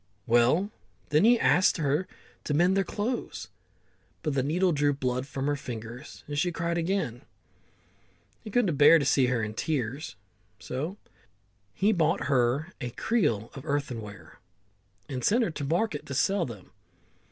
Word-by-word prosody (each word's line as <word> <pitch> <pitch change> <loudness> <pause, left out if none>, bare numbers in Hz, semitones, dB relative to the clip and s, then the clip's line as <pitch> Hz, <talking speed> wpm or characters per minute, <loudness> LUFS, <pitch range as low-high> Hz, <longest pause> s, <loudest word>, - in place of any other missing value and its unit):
Well, 125 - +3 0.4
then 150 +6 +4
he 240 +1 +5
asked 185 +1 +4
her 155 +3 0 0.4
to 145 - 0
mend 175 +4 +4
their 195 - +3
clothes, 215 +6 -4 0.7
but 150 - -1
the 135 - +1
needle 175 +7 +1
drew 145 -2 +2
blood 125 -1 -2
from 140 -2 -4
her 145 0 +1
fingers, 120 0 -8
and 145 0 -3
she 175 +2 +1
cried 170 0 -2
again. 165 - -1 1.2
He - - -7
couldn't 205 - +1
bear 150 +3 +8
to 145 - -1
see 130 -1 +3
her 120 -3 0
tears, 130 +3 -3 0.4
so 140 - -5 0.8
he 205 +3 +3
bought 155 -7 +1
a 125 +2 0
creel 150 - 0
of 135 - -9
earthenware, 120 -8 -5 0.7
and 125 -3 -5
sent 235 +4 +3
her 185 - -1
to 150 - -5
the 140 - -3
market 175 -3 -1
to 140 - -5
sell 190 +4 +1
them. 105 -6 -11
145 Hz, 150 wpm, -28 LUFS, 125-180 Hz, 1.2 s, bear